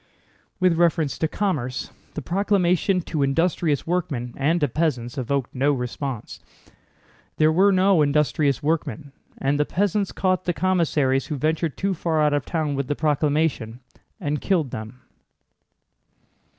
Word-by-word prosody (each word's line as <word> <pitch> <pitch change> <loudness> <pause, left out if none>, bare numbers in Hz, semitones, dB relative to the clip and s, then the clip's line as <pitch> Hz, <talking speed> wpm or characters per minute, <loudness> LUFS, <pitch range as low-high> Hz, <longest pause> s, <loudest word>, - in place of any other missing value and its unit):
With 180 -3 +3
reference 165 -4 +1
to 160 - +1
commerce, 140 -10 -2 0.2
the 155 - -4
proclamation 185 0 +1
to 160 -3 -3
industrious 155 +1 +1
workmen 145 -9 -2
and 155 +5 +1
to 145 - +3
peasants 125 -4 -1
evoked 135 -1 -2
no 140 +3 +2
response. 125 -1 -5 1.0
There 155 0 +4
were 190 +5 +4
no 190 -2 +4
industrious 145 -1 +1
workmen, 145 -4 -2 0.3
and 140 +2 0
the - - +4
peasants 200 +2 0
caught 185 -1 0
the 175 - 0
commissaries 155 -8 +1
who 150 - -3
ventured 155 +2 -1
too 195 0 0
far 165 -2 -1
out 150 -1 +3
of 145 -3 0
town 155 -4 -1
with 140 -1 -2
the 145 - -1
proclamation 145 -6 0 0.4
and 150 -4 -2
killed 165 -10 0
them. 110 +3 -8
155 Hz, 140 wpm, -23 LUFS, 135-175 Hz, 1.0 s, There